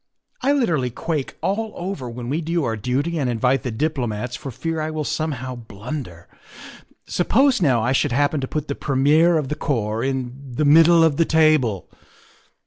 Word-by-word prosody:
" - - -40
I 275 - +2
literally 170 - +1
quake 150 +3 -4
all 215 +3 -1
over 175 -9 -5
when 120 0 -7
we 150 +6 -1
do 165 0 -1
our 115 -4 -1
duty 135 +10 -1
and 135 -4 0
invite 125 +2 +1
the 125 - -4
diplomats 125 -3 -2
for 135 - -7
fear 160 +6 -3
I 155 - -2
will 155 -1 -3
somehow 145 -4 -3
blunder. 110 - -8 0.8
Suppose, 255 +7 +2
now, 130 -8 +3
I 125 - +1
should 135 +1 +1
happen 145 +3 +1
to 130 - -3
put 155 +1 -4
the 140 - -2
premier 150 +5 +3
of 145 -4 -2
the 150 - -2
corps 115 -7 -2
in 130 0 -4
the 150 - +1
middle 165 +3 +6
of 155 -3 +2
the 165 - +3
table. 155 - +2
145 Hz, 185 wpm, -22 LUFS, 125-160 Hz, 0.8 s, middle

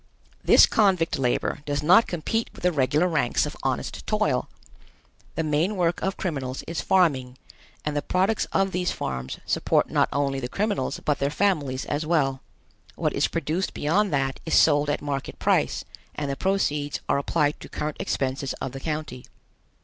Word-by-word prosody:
This - - +8
convict 190 -9 +2
labor 125 +3 0
does 145 0 -1
not 180 +9 +6
compete 185 +7 -2
with - - -14
the 180 - +3
regular 150 +3 +2
ranks 145 -8 +1
of - - -6
honest - - -3
toil. - - 0 0.9
The 165 - 0
main 155 +7 +1
work 175 -2 0
of 195 +1 -2
criminals 135 -7 -3
is 165 - -4
farming, 135 -9 +2 0.5
and 150 -1 -1
the 145 - +1
products 190 +7 +1
of 195 0 0
these 180 0 0
farms 65 0 -4
support - - +1
not - - +2
only 140 -1 0
the 125 -1 -4
criminals, 200 -8 -1
but 150 - +1
their 140 - +1
families 145 -7 0
as 145 +2 -2
well. 145 -5 +1 0.5
What - - -1
is - - +2
produced 165 +6 -2
beyond 185 +7 +1
that 135 -2 0
is 160 - 0
sold 145 -1 +4
at 145 - -1
market 140 -2 -4
price - - +1 0.3
and 145 -2 -2
the - - -2
proceeds 150 -6 0
are - - +2
applied 145 +1 0
to - - -11
current 150 0 -4
expenses 135 0 -2
of 130 - -5
the 135 - -7
county. 150 -4 -4
150 Hz, 170 wpm, -25 LUFS, 135-180 Hz, 0.9 s, This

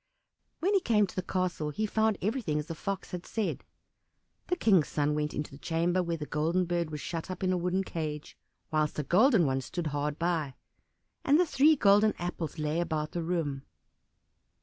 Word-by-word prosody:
When 385 +5 +2
he 395 - +5
came 215 - +3
to 185 - -11
the 185 - 0
castle 180 -4 -2
he 215 +9 -2
found 220 -1 +1
everything 210 - 0
as 150 - -2
the 165 - -5
Fox 195 +4 -4
had 180 -1 -5
said. 220 -3 -3 0.8
The 360 - +1
King's 195 - +4
son 150 0 0
went 150 0 -1
into 150 - -4
the 140 - -12
chamber 170 +3 +1
where 170 -1 -2
the 150 - -5
Golden 165 +5 0
Bird 170 -2 -1
was 150 -1 -5
shut 165 +5 -5
up 185 0 -5
in 185 0 +2
a - - +1
wooden 180 +2 0
cage, 155 -4 -5 0.4
whilst 155 -1 0
a 150 - 0
golden 200 - +4
one 135 -1 0
stood 170 +6 -5
hard 145 +1 -1
by; 165 -5 -1 0.7
and 290 +3 +4
the 360 - +5
three 310 0 +4
golden 210 -3 +4
apples 175 -3 -4
lay 155 +1 -1
about 155 -3 -2
the 175 - -3
room. 160 -5 -2
175 Hz, 195 wpm, -30 LUFS, 150-195 Hz, 0.8 s, he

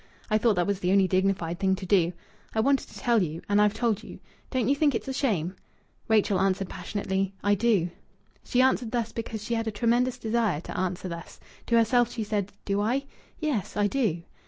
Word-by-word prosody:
I 215 - +4
thought 220 -1 +3
that 175 -1 +1
was 200 -2 -1
the 180 -1 0
only 195 -1 +5
dignified 185 -3 0
thing 190 -1 +2
to 190 - -7
do. 180 -3 +3 0.4
I - - +2
wanted 275 +4 +2
to - - -12
tell 235 -4 +2
you, 165 -2 -3
and 205 +1 +3
I've 210 0 +3
told 230 -4 0
you. - - -10 0.3
Don't 255 -5 0
you 275 - +3
think 285 -2 +2
it's 225 - -3
a 265 - -2
shame?" 195 - 0 0.5
Rachel 210 -3 +3
answered 195 0 +1
passionately 195 +1 -2
"I 205 +1 +3
do." 200 -5 +2 0.5
She 255 +1 +2
answered 260 -3 +2
thus 230 -2 -1
because 225 -2 -5
she 235 - -3
had 225 -1 -1
a - - 0
tremendous 240 +4 +1
desire 225 - 0
to - - -8
answer 185 0 -2
thus. 170 -1 -8 0.3
To 235 - +3
herself 240 +1 +3
she 225 - -3
said: 205 -2 -2
"Do 200 0 0
I?... 255 +6 0 0.3
Yes, 285 - -2
I 205 - +3
do." 205 -8 0
210 Hz, 210 wpm, -27 LUFS, 190-235 Hz, 0.5 s, only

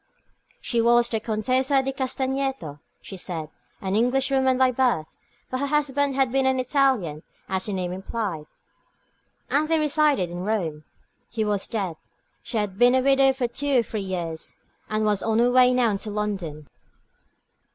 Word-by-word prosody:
She 235 -2 0
was 240 +1 +4
the 225 - -1
Contessa 255 +5 +1
di 270 - -1
Castagneto, 265 - -2 0.2
she 195 - -8
said, 160 -4 -4 0.3
an 190 0 -2
Englishwoman 260 +2 +2
by 260 -1 +4
birth; 240 -11 0 0.4
but 255 - -2
her 280 - -1
husband 285 -1 +1
had 265 -2 +2
been 265 0 +2
an 260 0 +2
Italian, 255 - +1 0.3
as 190 +1 -2
the 205 - -2
name 180 -2 -2
implied, 190 -5 -4 1.0
and 300 +2 +2
they 325 0 +2
resided 295 - +2
in 175 - -5
Rome. 170 -8 -2 0.4
He 220 -2 -2
was 205 -2 -1
dead 195 -8 -3 0.4
she 235 - -4
had 205 -2 -2
been 245 +1 +6
a 260 - +3
widow 270 0 +5
for 260 -2 -1
two 275 +3 0
or - - -5
three 215 -1 -4
years, 175 -4 -5 0.3
and 215 0 0
was 210 -2 +1
on 225 -1 0
her 240 +1 +4
way 250 0 +6
now 240 -4 +2
to 210 - -5
London. 190 -8 -4
235 Hz, 165 wpm, -24 LUFS, 195-265 Hz, 1.0 s, been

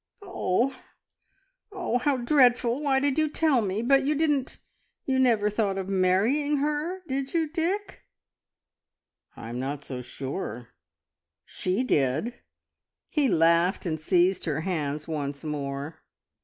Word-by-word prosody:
"Oh! 260 - 0 1.0
oh! 355 - -1
How 275 +2 +1
dreadful! 245 -1 +3
Why 275 -2 +2
did 285 +1 +1
you 310 -1 +2
tell 300 -5 +2
me? 205 +2 -2
But 275 +2 +4
you 295 +3 +1
didn't 290 -3 0 0.5
you 265 -1 +1
never 230 -5 +3
thought 210 -2 0
of 190 0 -4
marrying 205 +11 +2
her, 300 +6 -2
did 275 +2 -3
you, 325 -1 +2
Dick?" 345 +6 -2 1.4
"I'm 120 +2 -6
not 140 +2 -4
so 125 -2 -5
sure. 125 - -6 0.8
She 185 +7 -1
did!" 150 - +1 0.8
He 295 -4 +2
laughed, 170 +1 +3
and 160 -2 -2
seized 180 +3 +2
her 155 -2 -1
hands 155 -4 -3
once 145 -3 -4
more. 145 +1 -5
220 Hz, 130 wpm, -27 LUFS, -, 1.4 s, But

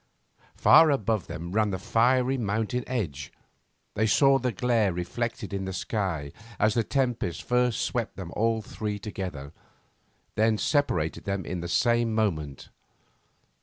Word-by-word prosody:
Far 160 - +7
above 110 - 0
them 85 +2 -6
ran 105 +1 +2
the 95 - -2
fiery 125 +7 +2
mountain 115 +1 -1
ridge. 80 - -3 0.6
They 110 +1 +1
saw 135 +5 +4
the 125 -1 -1
glare 115 -1 +1
reflected 105 +6 -4
in 95 -1 -2
the 95 - -4
sky 90 -9 -2 0.3
as 110 0 +2
the 115 - +1
tempest 125 - -1
first 125 -1 +1
swept 120 -3 -2
them 90 -3 -7
all 115 0 +1
three 105 -1 -4
together, 95 -9 -6 0.8
then 110 0 +2
separated 105 - 0
them 100 -1 -2
in 90 - -4
the 85 - -5
same 120 +3 +2
moment. 75 -11 -2
110 Hz, 140 wpm, -27 LUFS, 95-120 Hz, 0.8 s, Far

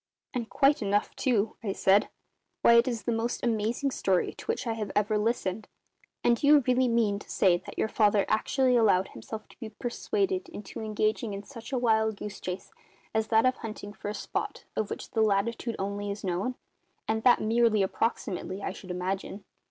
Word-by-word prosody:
"And 235 -3 -3
quite 280 0 +3
enough, 205 0 0
too," 225 -4 0
I 200 -3 -1
said. 195 +2 +3 0.5
"Why, 235 - +7
it 235 +2 +6
is 235 -3 -2
the 240 - -1
most 230 +1 -2
amazing 235 +4 0
story 190 -7 +1
to - - -12
which 455 - -1
I 230 - 0
have 215 -3 -4
ever 210 +1 +2
listened. 210 -2 -1 0.6
And 240 -1 +4
do 285 - 0
you 295 -1 +7
really 255 0 +3
mean 225 -4 +2
to - - -14
say 180 -3 +3
that - - -11
your - - +1
father 210 -2 +3
actually 255 +4 +2
allowed 200 -5 +4
himself 215 - -8
to - - -19
be 225 -3 -6
persuaded 370 - -2
into 210 - -8
engaging 215 0 -1
in 200 - -6
such 230 -1 -10
a 265 - 0
wild 220 -3 +2
goose 210 0 -7
chase 180 +1 -6 0.4
as 220 0 +1
that 225 +1 +4
of 255 0 +2
hunting 215 -2 -7
for 205 - -6
a 210 - -4
spot - - -4
of 215 - -1
which - - -6
the 225 - +1
latitude 220 +3 +1
only 200 +1 -3
is 200 +1 -5
known 195 +7 -1 0.5
and 220 0 0
that 245 +1 +5
merely 225 -1 +3
approximately, 195 -1 -2
I - - -2
should 190 -1 -11
imagine." 190 +2 -3
220 Hz, 195 wpm, -28 LUFS, 200-235 Hz, 0.6 s, Why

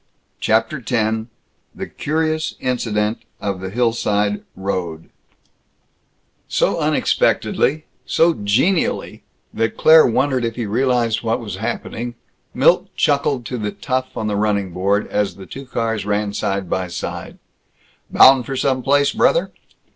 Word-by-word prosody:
CHAPTER 115 +7 +1
X 110 -2 0 0.5
THE - - -5
CURIOUS 155 +1 -2
INCIDENT 110 -4 -1 0.2
OF 100 -2 -3
THE 95 - -4
HILLSIDE 105 -2 0
ROAD 90 -4 -4 1.4
So - - +1
unexpectedly, 155 +3 +1 0.2
so 165 +1 +3
genially, 130 - 0 0.3
that 115 0 -1
Claire 160 0 +7
wondered 130 +1 +1
if 115 -1 -2
he 120 - -3
realized 120 0 +1
what 115 -1 0
was 105 -6 -6
happening, 120 +2 -4 0.4
Milt - - +3
chuckled 140 -3 +1
to 125 +2 -4
the 105 -1 -2
tough 130 -1 -3
on 110 - -2
the 105 -1 -1
running 100 -2 0
board, 100 +4 0
as 100 -4 -1
the 95 0 -11
two 135 +5 -9
cars 115 -3 -2
ran 105 0 -1
side 100 -2 -2
by 90 +1 -2
side, 85 - -6 0.7
"Bound 130 -2 +6
for 135 - -3
some 130 0 0
place, 140 +2 +3
brother?" - - +2
115 Hz, 130 wpm, -20 LUFS, 105-130 Hz, 1.4 s, Claire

